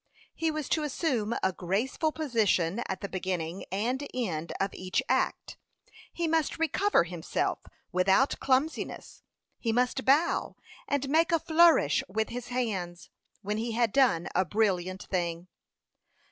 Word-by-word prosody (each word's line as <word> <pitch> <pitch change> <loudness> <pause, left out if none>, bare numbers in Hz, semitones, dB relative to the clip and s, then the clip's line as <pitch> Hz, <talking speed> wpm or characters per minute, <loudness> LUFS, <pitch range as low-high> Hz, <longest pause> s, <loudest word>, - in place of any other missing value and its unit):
He 325 - -1
was 305 -2 -3
to 315 - +1
assume 265 -7 -1
a 190 - +2
graceful 210 - -1
position 225 - +1
at 190 -1 -4
the 200 - -3
beginning 185 -2 -3
and 245 +8 -1
end 170 -10 -2
of 195 0 -1
each 185 0 -1
act; - - -1 0.5
he 340 -1 -2
must 320 -2 +1
recover 330 - +2
himself 170 -1 -2 0.3
without 190 +9 +3
clumsiness; 270 +4 -1 0.4
he 230 - 0
must 250 +3 +1
bow, 290 +6 +2 0.3
and 280 -1 0
make 320 +4 +3
a 335 - +5
flourish 325 - +4
with 220 +3 -1
his 245 0 -6
hands, 195 -9 -3 0.3
when 210 +2 -2
he 230 0 -2
had 235 -2 +1
done 230 -12 +3
a 185 - +3
brilliant 185 -1 0
thing. 175 -1 -3
225 Hz, 140 wpm, -29 LUFS, 185-285 Hz, 0.5 s, a